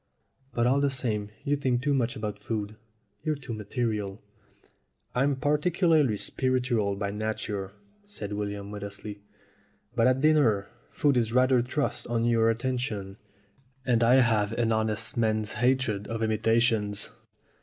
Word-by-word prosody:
But 120 - +2
all 135 +3 +3
the 140 - +3
same 110 -6 0
you 145 0 +1
think 130 -3 0
too 145 -1 +2
much 120 -3 0
about 105 -2 -4
food. 105 0 -4 0.5
You're 155 - -1
too 125 -4 -7
material." 105 -2 -3 0.9
"I'm 135 +3 +2
particularly 150 - +2
spiritual 125 -5 0
by 100 0 -3
nature," 105 -2 -3 0.3
said 155 - -5
William 100 -1 -4
modestly. 100 0 -6 0.7
"But 115 0 +4
at 130 +1 +3
dinner 140 -10 +3 0.2
food 145 -3 +2
is 115 -2 +1
rather 130 0 +4
thrust 130 +4 -1
on 115 -1 0
your 115 -1 +3
attention, 115 -5 -2 0.7
and 120 -3 +2
I 120 +2 +6
have 110 -4 +3
an 115 -1 +1
honest 110 +3 0
man's 110 -2 +1
hatred 125 -5 +1
of 115 0 -3
imitations. 110 -1 +1
115 Hz, 135 wpm, -27 LUFS, 105-130 Hz, 0.9 s, I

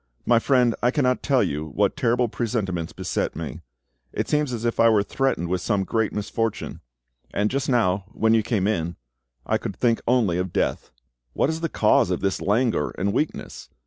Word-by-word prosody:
My 120 -1 +4
friend, 125 -2 +3
I 120 - +3
cannot 130 -2 +1
tell 135 -4 +2
you 75 +2 -2
what 80 -4 0
terrible 120 +1 +1
presentiments 105 -8 -2
beset - - -3
me; - - -6 0.5
it - - -2
seems 150 -3 +1
as 120 -1 -4
if 115 - -1
I 115 - +6
were 105 -3 +3
threatened 130 -7 -1
with 90 +1 -1
some 100 -2 0
great 110 +2 0
misfortune; 110 +1 -3 0.5
and 105 +1 0
just 140 +1 -1
now, 100 -6 +2
when 110 +1 +1
you 115 - +4
came 105 -3 -1
in, 85 -5 -1 0.5
I - - +1
could - - -5
think 115 -2 +1
only 115 -8 +2
of 90 -1 -2
death. - - -1 0.4
What 140 - +1
is 160 +1 -5
the 165 - -1
cause - - +3
of - - -1
this 95 -1 -1
languor 110 - +1
and 100 +2 0
weakness? 150 +5 -3
115 Hz, 190 wpm, -24 LUFS, 95-125 Hz, 0.5 s, I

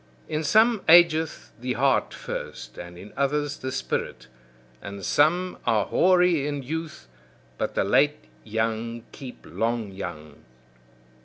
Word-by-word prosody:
In 155 0 -2
some 220 +7 +4
ageth 165 -2 +5
the 125 0 -1
heart 135 +2 +2
first, - - -7
and 85 0 -9
in 100 +4 -12
others 145 +1 0
the 130 - -5
spirit. 130 - -3 0.6
And 100 -1 -7
some 175 +5 +2
are - - +2
hoary 180 -5 +3
in 145 -2 -3
youth, 160 - -5 0.5
but - - -2
the - - +2
late 60 - +2 0.2
young 115 +1 -2
keep 130 -3 -10
long 115 -2 -2
young. 80 -6 -8
135 Hz, 130 wpm, -25 LUFS, 110-160 Hz, 0.6 s, ageth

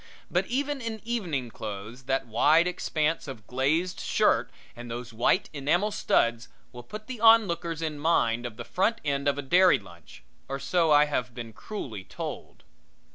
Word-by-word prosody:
But - - +1
even 280 +2 -1
in 225 -2 -4
evening 175 - -2
clothes, 110 +5 -7
that 135 0 0
wide 150 +9 +4
expanse 160 -3 -1
of 120 -6 -8
glazed 155 +9 0
shirt - - +2 0.3
and 120 0 -9
those 120 0 -6
white 120 - +2
enamel 165 +9 +1
studs 115 - +1 0.2
will 125 - -9
put 215 - -9
the 250 -3 -7
onlookers 170 -8 +4
in 155 -2 -3
mind 120 -7 +1
of 110 -2 -11
the - - -7
front 225 +5 0
end 140 -1 0
of 140 0 +2
a 145 - -3
dairy 180 +2 +5
lunch 85 - -15 0.3
or 135 - -2
so 165 +3 +1
I 150 0 +6
have 125 -5 -3
been 115 -2 -7
cruelly 115 - -7
told. 90 - -7
145 Hz, 170 wpm, -27 LUFS, 120-180 Hz, 0.3 s, I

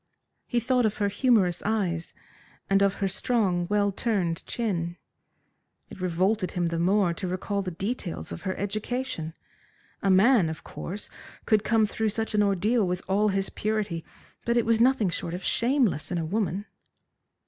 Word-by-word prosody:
He 240 - +1
thought 245 0 +2
of 210 - -4
her 205 -1 +1
humorous 205 -5 +2
eyes, 185 -6 -1 0.6
and 195 0 +5
of 200 -1 +3
her 195 - 0
strong, 190 -3 0
well 205 -1 +2
turned 190 -6 -1
chin. 175 -7 -2 0.9
It 190 - -10
revolted 185 +3 +1
him 175 -1 0
the 165 0 -1
more 185 0 +3
to 185 +2 -4
recall 195 +3 -2
the 190 - -3
details 180 - -4
of 85 - -6
her 190 - -3
education. 205 -5 -3 0.7
A 195 - +1
man, 195 -1 +5
of 160 - -7
course, 200 +4 -5 0.3
could 215 -2 +3
come 225 -1 +3
through 220 +1 -1
such 220 +1 -2
an 210 - +3
ordeal 205 +2 +2
with 180 +1 -2
all 200 +3 +2
his 195 -1 0
purity, 210 -6 -2 0.4
but 235 0 +1
it 235 - +3
was 230 0 +3
nothing 245 -5 +4
short 170 0 -3
of 180 - -7
shameless 235 - +1
in 175 - 0
a 165 - -1
woman. 195 +1 -1
200 Hz, 170 wpm, -27 LUFS, 180-220 Hz, 0.9 s, and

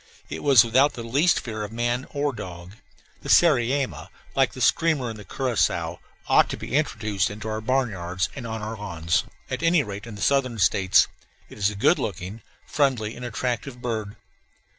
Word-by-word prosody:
It - - -5
was 135 -6 +6
without 130 +5 +3
the 115 - -7
least 140 +9 +2
fear 110 -3 -6
of 105 0 -5
man 120 +3 -1
or 145 -1 -1
dog. 90 -5 -8 0.5
The - - -8
sariema 135 -4 +3 0.3
(like - - +2
the - - -9
screamer 150 -8 +2
and 110 - -9
the - - -9
curassow) 125 +1 -1 0.3
ought - - +5
to - - -4
be - - -7
introduced 110 -9 0
into 105 +2 -7
our 110 0 -3
barnyards 100 -8 -1
and 125 -4 -6
on 110 -1 -5
our 110 +1 -4
lawns, 85 -5 -1 0.3
at - - -2
any 165 -2 +3
rate 105 0 -7
in 110 - -8
the 100 - -9
Southern 130 -4 +2
States; 95 -1 +4 0.4
it - - -12
is 100 0 +3
a 105 - -7
good 100 - +3
looking, 95 +3 -5 0.2
friendly, 130 -7 0
and 125 - -9
attractive 125 +2 -3
bird. 110 -4 -4
115 Hz, 185 wpm, -24 LUFS, 105-135 Hz, 0.5 s, was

